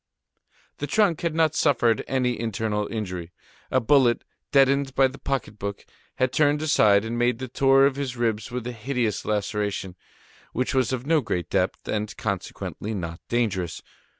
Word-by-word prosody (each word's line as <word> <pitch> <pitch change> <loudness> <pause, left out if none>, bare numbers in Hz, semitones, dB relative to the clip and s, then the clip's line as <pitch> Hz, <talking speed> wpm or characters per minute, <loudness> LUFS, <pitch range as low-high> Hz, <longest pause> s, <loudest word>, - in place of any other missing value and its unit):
The 145 - -3
trunk 200 -5 +2
had 170 -2 -1
not 160 -2 +3
suffered 120 -7 +2
any 125 -2 0
internal 110 -2 -1
injury; 90 -6 -5 0.4
a 130 - +3
bullet, 125 -1 +3 0.3
deadened 140 0 +3
by 135 0 +5
the 135 +1 -11
pocket 125 -7 -3
book, 100 0 -5 0.3
had 130 -1 0
turned 150 0 +3
aside 105 -9 +4
and 115 +1 -3
made 120 -1 +2
the 130 +1 -5
tour 135 +2 +4
of 140 -1 +1
his 130 -3 -3
ribs 115 -1 -1
with 125 -1 -4
a 125 - -3
hideous 120 -2 -2
laceration, 105 -3 -2 0.6
which 125 +2 -1
was 130 -2 +2
of 130 -1 -3
no 160 0 +3
great 90 - -3
depth, - - 0
and 105 0 -3
consequently, 105 +1 -4
not 85 -3 -5
dangerous. 100 -8 -1
120 Hz, 165 wpm, -25 LUFS, 105-135 Hz, 0.6 s, by